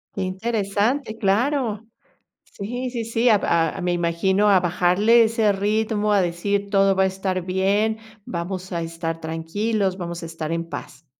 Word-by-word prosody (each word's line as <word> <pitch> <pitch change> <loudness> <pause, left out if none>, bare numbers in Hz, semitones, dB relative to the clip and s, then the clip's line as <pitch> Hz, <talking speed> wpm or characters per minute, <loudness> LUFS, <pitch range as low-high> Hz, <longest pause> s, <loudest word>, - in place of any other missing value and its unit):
Que 195 - -3
interesante, 215 +5 -1
claro. 225 +1 0 0.6
Sí, 245 +5 -5
sí, 235 -2 -3
sí, 230 +2 +2
ab 210 -3 +4
a 165 -2 +1
me 180 0 0
imagino 175 +4 +1
a 195 -2 +6
bajarle 180 +6 +4
ese 220 -1 +2
ritmo, 210 +1 0
a 200 - +4
decir 200 +4 -1
todo 195 -1 +4
va 190 - +3
a - - +4
estar 190 -1 -2
bien, 200 +4 +1 0.3
vamos 185 +2 -5
a 170 -2 -2
estar 165 0 -4
tranquilos, 190 +5 -1
vamos 170 -2 -5
a - - -4
estar 165 -1 -5
en 165 0 -2
paz. 145 -2 -9
195 Hz, 160 wpm, -22 LUFS, 175-215 Hz, 0.6 s, a